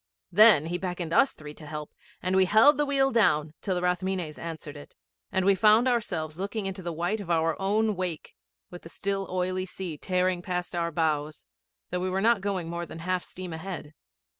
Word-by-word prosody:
Then 210 -5 +7
he 175 +2 -3
beckoned 180 -3 -4
us 275 +5 +4
three 150 -1 -10
to 150 0 -11
help, 150 0 -6 0.3
and 185 +1 0
we 190 0 +5
held 225 +9 +6
the 295 - +2
wheel 270 -1 +2
down 155 - +2
till 190 - -1
the 180 - -2
Rathmines 180 -3 -1
answered 160 -3 -7
it, 145 - -12 0.4
and 190 -1 +1
we 200 - +6
found 215 +5 +5
ourselves 175 -10 -1
looking 200 +2 -3
into 195 0 -4
the 175 -1 -4
white 175 +6 -1
of 195 -4 -8
our 165 -1 +2
own 210 +2 +1
wake, 180 -3 -4 0.4
with 175 - -9
the 165 - -12
still 195 +2 -3
oily 185 0 -1
sea 170 -5 -6
tearing 185 -1 0
past 180 0 -3
our 170 -1 0
bows, 155 -2 -1 0.5
though 180 - -1
we 185 +1 -1
were 190 +1 -1
not 225 0 +3
going 190 -4 -2
more 170 0 -4
than 160 - -9
half 180 +2 -2
steam 180 -2 -8
ahead. 160 -2 -7
180 Hz, 205 wpm, -27 LUFS, 165-195 Hz, 0.5 s, Then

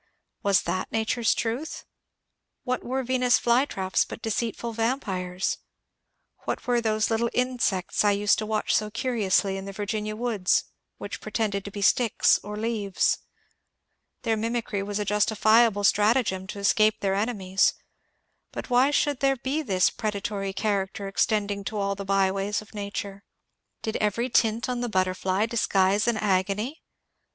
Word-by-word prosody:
Was 200 -2 +3
that 185 - -3
nature's 225 +1 +1
truth? 240 +8 -3 0.8
What 255 -1 -2
were 260 +2 -2
Venus' 250 0 +3
flytraps 235 -6 +1
but - - -8
deceitful 230 +1 -2
vampires? 195 -6 -2 0.9
What - - -3
were 245 -1 +2
those 215 -1 0
little 230 +1 +1
insects 245 -9 0
I 205 - +4
used 205 0 +2
to 215 - -3
watch 215 -1 0
so 215 0 +1
curiously 210 -5 0
in 195 - -6
the 195 - -6
Virginia 210 +1 -3
woods, 215 -5 +1 0.3
which - - -7
pretended 205 -3 -2
to 200 - -6
be 200 0 -4
sticks 230 +2 +4
or 210 +1 -6
leaves? 215 -3 0 1.0
Their 225 -2 +1
mimicry 225 -2 -2
was 205 +1 -3
a 210 - -1
justifiable 215 +1 +3
strat 210 +3 +4
agem 190 -7 -1
to 205 - -7
escape 215 +2 +3
their 195 -1 +1
enemies, 195 -2 +1 0.8
but - - -7
why 250 +3 +5
should 290 -2 +1
there 270 -1 +2
be 270 +5 -2
this 190 -9 +2
predatory 200 -2 -3
character 195 0 -2
extending 200 0 0
to 215 - -4
all 200 -1 0
the 200 0 -7
byways 195 +1 +1
of 215 - -13
nature? 200 -1 -5 0.6
Did 220 - -2
every 225 +4 0
tint 225 +1 +2
on 250 -1 -2
the 245 - -2
butterfly 185 +1 0
disguise 205 -2 +2
an 235 -2 +2
agony 205 - 0
210 Hz, 150 wpm, -26 LUFS, 195-235 Hz, 1.0 s, why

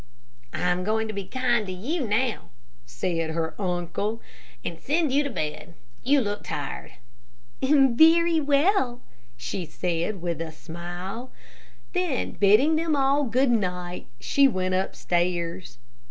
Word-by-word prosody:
"I'm 180 +3 0
going 220 +2 0
to - - -3
be 200 -1 -4
kind 240 -2 0
to - - -4
you 250 - -2
now," 225 +2 0 0.4
said 165 +7 -2
her 160 0 -2
uncle, 180 +4 -2 0.5
"and 165 -1 -4
send 305 - +1
you 280 +2 +4
to 285 - -2
bed. 155 - -5 0.3
You 275 +2 +3
look 205 -2 -3
tired." - - -5 0.7
"Very 315 +5 +5
well," 280 - +2 0.4
she 175 +9 -4
said, 170 +4 -2
with 170 -1 -3
a 165 -1 -4
smile. 175 +9 -7 0.6
Then 360 -8 0
bidding 230 +11 +4
them 320 -1 +1
all 275 +1 +3
good 255 +2 +2
night, 180 -5 -2
she 280 -1 +4
went 185 -6 -1
upstairs. 175 - -1
210 Hz, 130 wpm, -26 LUFS, 175-275 Hz, 0.7 s, Very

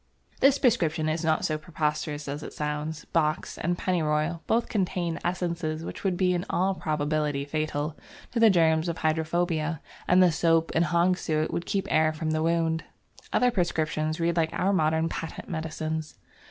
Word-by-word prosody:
This 275 0 +5
prescription 170 - +2
is 155 +1 -1
not 160 -1 +1
so 155 -1 -1
preposterous 150 -2 -2
as 145 +2 -4
it - - -8
sounds. 150 +1 -3
Box 155 -2 -1
and 175 +2 0
Pennyroyal 165 -2 0
both 230 +1 +2
contain 180 -4 -1
essences 170 -3 -2
which - - -7
would 190 -3 0
be 180 -1 +2
in 175 0 -1
all 190 +2 +1
probability 150 -3 -1
fatal 155 0 -2 0.4
to 240 - -1
the 225 -1 +7
germ 165 -4 +4
of 165 - -3
hydrophobia, 160 0 0 0.3
and 185 +1 +6
the 180 - +5
soap 165 0 +2
and 165 - +3
hog's 175 +3 +2
suet 155 0 -1
would 170 - -3
keep 195 -1 0
air 155 0 +3
from 155 0 -2
the 155 0 0
wound. 165 0 +1 0.5
Other 250 0 +3
prescriptions 155 -4 -1
read 170 0 +1
like 160 -1 +2
our 195 +2 +1
modern 160 -2 +2
patent 165 0 -6
medicines. 160 -1 -4
160 Hz, 170 wpm, -27 LUFS, 155-175 Hz, 0.5 s, the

